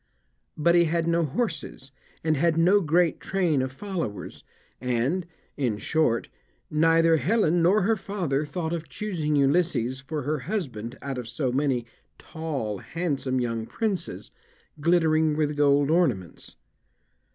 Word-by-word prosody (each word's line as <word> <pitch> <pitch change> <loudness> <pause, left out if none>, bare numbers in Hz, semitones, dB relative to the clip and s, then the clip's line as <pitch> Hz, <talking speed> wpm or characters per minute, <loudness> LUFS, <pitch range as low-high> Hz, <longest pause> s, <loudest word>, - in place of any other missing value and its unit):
But 170 +3 +3
he 175 0 +5
had 165 +1 0
no 170 0 +2
horses, 140 - -4 0.3
and 155 -1 +2
had 165 +2 +2
no 185 +5 +5
great 170 0 +2
train 175 -8 +1
of 130 0 -2
followers; 165 - -5 0.4
and, 130 +9 0 0.3
in 120 -7 0
short, 120 -1 +1 0.4
neither 165 +1 +4
Helen 175 -2 +2
nor 185 +4 +4
her 225 +4 +3
father 175 -9 -2
thought 160 +2 -3
of 170 -1 -5
choosing 165 -8 -2
Ulysses 140 -3 +2
for 150 +2 -5
her 150 +2 -1
husband 130 - -4
out 135 -2 -3
of 120 - -6
so 125 +2 -2
many 130 -3 0 0.3
tall, 140 - -4
handsome 140 - -2
young 115 -2 -2
princes, 215 -5 -3 0.5
glittering 160 -1 +3
with 150 -1 0
gold 145 0 +3
ornaments. 130 - 0
155 Hz, 135 wpm, -26 LUFS, 135-170 Hz, 0.5 s, he